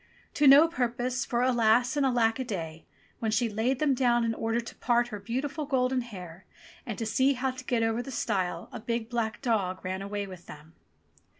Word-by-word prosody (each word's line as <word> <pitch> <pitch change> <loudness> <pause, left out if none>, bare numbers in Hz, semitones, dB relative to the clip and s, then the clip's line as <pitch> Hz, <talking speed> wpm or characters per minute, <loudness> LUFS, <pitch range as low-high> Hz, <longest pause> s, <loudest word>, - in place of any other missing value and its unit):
To 290 - +3
no 285 +4 +9
purpose, 250 -4 -2
for 240 0 0
alas, 245 +1 +3
and 290 - +1
alack 240 -3 +2
a - - 0
day! 165 -9 -6 0.3
when 225 - -1
she 225 +2 +1
laid 225 +5 0
them 290 0 +2
down 240 -2 +2
in 225 - 0
order 225 +1 -1
to 235 - -8
part 240 -1 +1
her 210 -3 -6
beautiful 275 +8 -3
golden 255 -1 +1
hair 185 -6 -10 0.4
and 220 - -4
to 225 - -3
see 260 +5 +2
how 260 0 -1
to 255 0 -10
get 245 -3 0
over 225 +1 0
the 270 - -8
stile, 185 -8 -2
a - - -6
big 230 +1 -3
black 225 0 -2
dog 195 -7 -1
ran 190 +1 -3
away 200 +1 -3
with 185 -2 -11
them. 150 +2 -12
235 Hz, 205 wpm, -28 LUFS, 210-255 Hz, 0.4 s, no